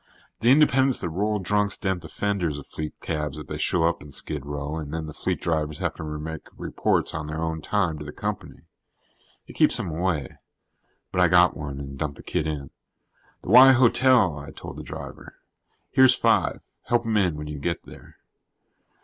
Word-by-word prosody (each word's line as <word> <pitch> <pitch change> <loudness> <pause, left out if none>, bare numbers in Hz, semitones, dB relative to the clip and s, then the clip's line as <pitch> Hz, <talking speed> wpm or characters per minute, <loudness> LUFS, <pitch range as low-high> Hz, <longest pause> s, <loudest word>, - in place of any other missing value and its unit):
The 115 - +3
independents 135 -2 +4
that 85 - -2
roll 105 +6 0
drunks 105 +1 0
dent 95 -2 -2
the 80 - -9
fenders 95 -8 -1
of 75 - -9
fleet 75 -1 -7
cabs 75 -1 -3
if 75 - -7
they - - -6
show 85 - +1
up 85 +1 +1
in 75 - -12
Skid 70 +1 -4
Row 75 +2 -4
and 75 -3 -6
then 80 0 -3
the 75 - -8
fleet - - -2
drivers 75 -2 -1
have - - -2
to - - -8
make 75 0 -6
reports - - 0
on 75 0 -4
their 80 +1 -4
own 80 -1 -2
time 90 -4 0
to - - -6
the 75 - -7
company. - - -5 0.8
It - - -12
keeps - - +4
them 85 - -3
away. 80 -3 -2 0.7
But 95 - +1
I 90 - +6
got 90 +1 +5
one 70 -2 -6
and 70 -1 -8
dumped 75 -2 -3
the - - -12
kid 80 - -2
in. 75 -3 -5 0.7
"The - - -7
Y 130 +3 +9
Hotel," 125 - +4
I 70 +2 -9
told 75 - -9
the - - -6
driver. - - -9 0.6
"Here's 130 -1 +6
five. - - +2 0.2
Help 120 -1 +1
him 110 -1 0
in 90 -6 +2
when 75 0 -6
you 75 -1 -6
get 85 +4 -2
there." - - -14
80 Hz, 200 wpm, -25 LUFS, 75-100 Hz, 0.8 s, Y